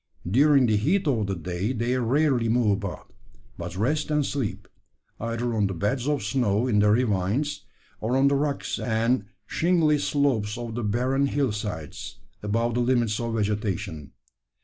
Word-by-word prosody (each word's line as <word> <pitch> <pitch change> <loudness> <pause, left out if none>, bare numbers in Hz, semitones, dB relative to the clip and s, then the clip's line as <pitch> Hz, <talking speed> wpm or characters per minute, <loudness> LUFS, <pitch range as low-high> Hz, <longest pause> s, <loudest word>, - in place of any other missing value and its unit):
During 135 +6 +5
the 110 -3 +2
heat 170 - +1
of 115 -7 +1
the 95 - -1
day 90 +7 -3
they 120 +1 0
rarely 130 -1 +2
move 115 -2 +3
about, 100 -2 -4 0.4
but 85 0 -6
rest 150 +11 0
and 150 -2 +1
sleep 135 -8 -3 0.5
either 115 +1 -2
on 105 -3 +2
the 95 - -4
beds 120 - -1
of 145 -5 0
snow 110 -1 +1
in 110 -5 +2
the 105 0 +4
ravines, 115 +6 0 0.3
or 120 +4 0
on 135 +1 +4
the 140 - +3
rocks 145 0 -1
and 115 -1 +1 0.2
shingly 160 0 +2
slopes 130 -8 0
of 120 -2 -5
the 120 +1 -3
barren 130 +6 +1
hill 140 -3 0
sides, 105 -8 -6 0.2
above 115 +3 0
the 120 - 0
limits 120 -3 +1
of 115 -1 -2
vegetation. 100 -8 -2
115 Hz, 165 wpm, -25 LUFS, 105-135 Hz, 0.5 s, During